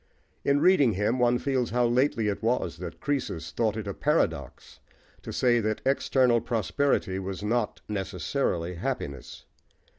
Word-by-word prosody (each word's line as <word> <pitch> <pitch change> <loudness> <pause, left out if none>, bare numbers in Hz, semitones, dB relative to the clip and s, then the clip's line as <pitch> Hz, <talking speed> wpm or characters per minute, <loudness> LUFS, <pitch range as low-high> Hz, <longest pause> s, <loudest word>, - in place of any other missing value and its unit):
In 140 +1 +2
reading 145 - +5
him 105 +6 0
one 120 0 +3
feels 130 -1 -1
how 120 +2 +2
lately 120 -2 +2
it 100 - -2
was 115 +3 0
that - - -7
Croesus 130 - -3
thought 110 -2 0
it 110 - -4
a 100 - -3
paradox - - -1 0.4
to - - -7
say 120 -1 +3
that 110 -1 -1
external 130 -3 +3
prosperity 115 -3 0
was 95 +1 -5
not 110 +1 -1
necessarily 95 -2 -2
happiness. 85 - -5
115 Hz, 145 wpm, -27 LUFS, 100-130 Hz, 0.4 s, reading